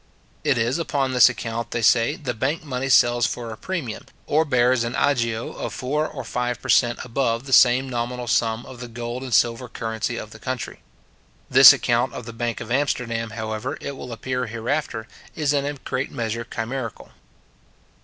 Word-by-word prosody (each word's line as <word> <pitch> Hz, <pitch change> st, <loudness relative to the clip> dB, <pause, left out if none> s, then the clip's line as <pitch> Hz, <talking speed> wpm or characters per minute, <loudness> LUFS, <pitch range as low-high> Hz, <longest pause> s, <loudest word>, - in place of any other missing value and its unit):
It 145 Hz, -4 st, +2 dB
is 120 Hz, +7 st, 0 dB
upon 140 Hz, -5 st, -1 dB
this 125 Hz, 0 st, +7 dB
account, 115 Hz, -1 st, -4 dB
they 120 Hz, -, -2 dB
say, 115 Hz, +6 st, +4 dB
the 125 Hz, -5 st, -4 dB
bank 140 Hz, +8 st, -2 dB
money 135 Hz, -2 st, -3 dB
sells 120 Hz, -1 st, +5 dB
for 120 Hz, -2 st, -5 dB
a -, -, -6 dB
premium, 145 Hz, -8 st, -5 dB, 0.2 s
or 155 Hz, +2 st, +2 dB
bears 125 Hz, -3 st, +3 dB
an 120 Hz, +1 st, -3 dB
agio 115 Hz, -5 st, 0 dB
of -, -, -5 dB
four 150 Hz, +4 st, -1 dB
or 135 Hz, -, -7 dB
five 125 Hz, -1 st, -2 dB
per -, -, -9 dB
cent. 120 Hz, -1 st, +4 dB
above 120 Hz, -1 st, -1 dB
the 135 Hz, -, -3 dB
same 130 Hz, +2 st, +6 dB
nominal 125 Hz, 0 st, -3 dB
sum 115 Hz, 0 st, 0 dB
of 130 Hz, -2 st, -11 dB
the 125 Hz, -, -6 dB
gold 120 Hz, +1 st, -5 dB
and 130 Hz, -1 st, -6 dB
silver 115 Hz, +3 st, +2 dB
currency 115 Hz, 0 st, -3 dB
of 110 Hz, -, -7 dB
the 110 Hz, -, -12 dB
country. 130 Hz, -1 st, -5 dB, 0.7 s
This -, -, +11 dB
account 120 Hz, +1 st, +1 dB
of 125 Hz, -, -7 dB
the 115 Hz, -, -8 dB
bank 120 Hz, 0 st, -3 dB
of 115 Hz, 0 st, -7 dB
Amsterdam, 125 Hz, -4 st, -1 dB
however, 110 Hz, -1 st, -4 dB
it 140 Hz, -, -6 dB
will 125 Hz, -2 st, -8 dB
appear 125 Hz, +2 st, -3 dB
hereafter, 115 Hz, +1 st, -3 dB, 0.3 s
is 150 Hz, -2 st, +1 dB
in 140 Hz, -1 st, +1 dB
a 145 Hz, -, -2 dB
great 130 Hz, 0 st, -4 dB
measure 115 Hz, 0 st, -3 dB
chimerical. 115 Hz, +1 st, -5 dB
120 Hz, 185 wpm, -23 LUFS, 115-130 Hz, 0.7 s, This